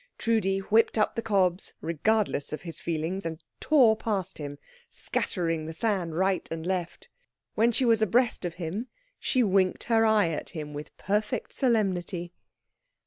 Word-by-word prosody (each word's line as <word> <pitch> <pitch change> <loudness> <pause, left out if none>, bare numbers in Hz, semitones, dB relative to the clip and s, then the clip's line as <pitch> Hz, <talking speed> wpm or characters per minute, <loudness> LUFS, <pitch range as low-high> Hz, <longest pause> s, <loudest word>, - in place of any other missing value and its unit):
Trudi 215 -4 +1
whipped 215 +4 +2
up 215 - +2
the 230 - -2
cobs, 190 -4 +1
regardless 170 0 0
of 155 - -5
his 165 -3 -5
feelings, 170 +4 -2
and 160 0 -5 0.2
tore 255 -8 +5
past 205 -7 -3
him, 145 -1 -6 0.3
scattering 165 -3 -2
the 160 - -6
sand 180 -5 -1
right 190 +1 +1
and 165 0 -5
left. 180 -2 -3 0.5
When 230 +2 +3
she 235 +3 +1
was 225 -2 +4
abreast 230 +3 +2
of 175 -2 -3
him, 185 +8 -4 0.3
she 255 -2 +2
winked 190 -3 +2
her 225 -1 +3
eye 215 -5 +4
at 155 - -4
him 150 -4 -6
with 145 +1 -8
perfect 210 +2 -1
solemnity. 185 -8 0
190 Hz, 155 wpm, -28 LUFS, 165-220 Hz, 0.5 s, tore